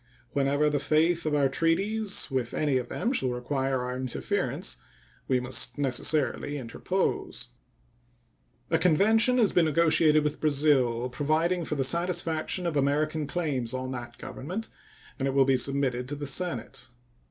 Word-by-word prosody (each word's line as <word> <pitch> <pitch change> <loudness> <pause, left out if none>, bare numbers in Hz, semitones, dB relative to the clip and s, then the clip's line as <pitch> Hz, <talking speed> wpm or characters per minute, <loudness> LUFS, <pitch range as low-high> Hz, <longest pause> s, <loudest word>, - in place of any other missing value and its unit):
Whenever 140 +2 +1
the 145 -1 +1
faith 160 +3 +1
of 150 - +1
our 140 -2 +3
treaties 195 +7 0
with 125 -3 -2
any 145 -4 +1
of 125 -1 -3
them 240 - -2
shall 130 - 0
require 130 +1 -2
our 125 0 -4
interference, 130 -1 -2 0.5
we 130 - +2
must 125 - 0
necessarily 145 +1 0
interpose. 145 +9 -3 1.2
A 165 - +3
convention 220 +9 +4
has 225 -5 +3
been 175 - +3
negotiated 155 -1 +3
with 150 0 -3
Brazil 135 -5 +2
providing 155 +6 0
for 150 - -2
the 135 - 0
satisfaction 170 +3 0
of 170 -3 -1
American 150 +2 0
claims 140 -7 -2
on 130 0 -4
that 120 -2 -7
Government, 185 +11 -6 0.5
and 135 - 0
it 135 - -2
will 135 -1 +5
be 135 0 +3
submitted 130 -1 0
to 145 - -3
the 145 0 -6
Senate. 135 -6 -1
145 Hz, 150 wpm, -27 LUFS, 130-165 Hz, 1.2 s, will